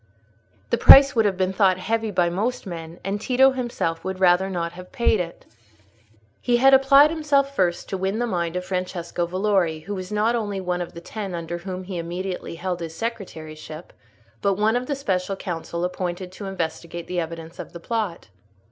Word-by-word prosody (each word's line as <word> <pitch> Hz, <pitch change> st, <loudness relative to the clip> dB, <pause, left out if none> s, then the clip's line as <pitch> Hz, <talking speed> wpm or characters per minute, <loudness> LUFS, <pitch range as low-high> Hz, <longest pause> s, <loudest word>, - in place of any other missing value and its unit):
The -, -, +2 dB
price 275 Hz, 0 st, +9 dB
would 225 Hz, -2 st, +3 dB
have 195 Hz, -2 st, +1 dB
been 185 Hz, 0 st, 0 dB
thought 190 Hz, -2 st, +3 dB
heavy 220 Hz, +4 st, -1 dB
by 180 Hz, -3 st, +2 dB
most 210 Hz, +10 st, -2 dB
men; 165 Hz, -2 st, -7 dB
and 200 Hz, +2 st, -3 dB
Tito 265 Hz, +3 st, +4 dB
himself 240 Hz, -10 st, -3 dB
would 190 Hz, 0 st, -4 dB
rather 185 Hz, +1 st, +4 dB
not 170 Hz, -3 st, -2 dB
have 180 Hz, +1 st, -12 dB
paid 235 Hz, -5 st, +2 dB
it. 170 Hz, -1 st, -5 dB, 1.0 s
He 245 Hz, -1 st, +2 dB
had 270 Hz, +2 st, +6 dB
applied 275 Hz, +3 st, +7 dB
himself 285 Hz, -3 st, +1 dB
first 175 Hz, -5 st, 0 dB
to 190 Hz, -, -3 dB
win 190 Hz, +3 st, -1 dB
the 240 Hz, -, 0 dB
mind 175 Hz, -6 st, -2 dB
of 180 Hz, 0 st, -3 dB
Francesco 180 Hz, -2 st, -3 dB
Valori, 185 Hz, -4 st, +1 dB
who 205 Hz, +5 st, -5 dB
was 185 Hz, -1 st, -6 dB
not 210 Hz, +3 st, +2 dB
only 205 Hz, -4 st, -2 dB
one 180 Hz, -1 st, -2 dB
of 175 Hz, -, -6 dB
the 170 Hz, -, -8 dB
Ten 195 Hz, 0 st, -5 dB
under 170 Hz, +1 st, -4 dB
whom 185 Hz, +1 st, -6 dB
he 180 Hz, -1 st, -5 dB
immediately 180 Hz, +1 st, -5 dB
held 180 Hz, +1 st, -3 dB
his 165 Hz, -1 st, -6 dB
secretaryship, 160 Hz, -8 st, -7 dB, 0.5 s
but 200 Hz, -1 st, +2 dB
one 215 Hz, +3 st, +2 dB
of 250 Hz, +1 st, -1 dB
the 285 Hz, -, -1 dB
special 195 Hz, -7 st, -1 dB
council 170 Hz, -1 st, -4 dB
appointed 180 Hz, 0 st, -4 dB
to 200 Hz, +2 st, -8 dB
investigate 170 Hz, -2 st, -4 dB
the 180 Hz, -1 st, -2 dB
evidence 165 Hz, 0 st, -6 dB
of -, -, -7 dB
the 170 Hz, -, -9 dB
plot. 205 Hz, -, -3 dB
185 Hz, 190 wpm, -23 LUFS, 175-220 Hz, 1.0 s, price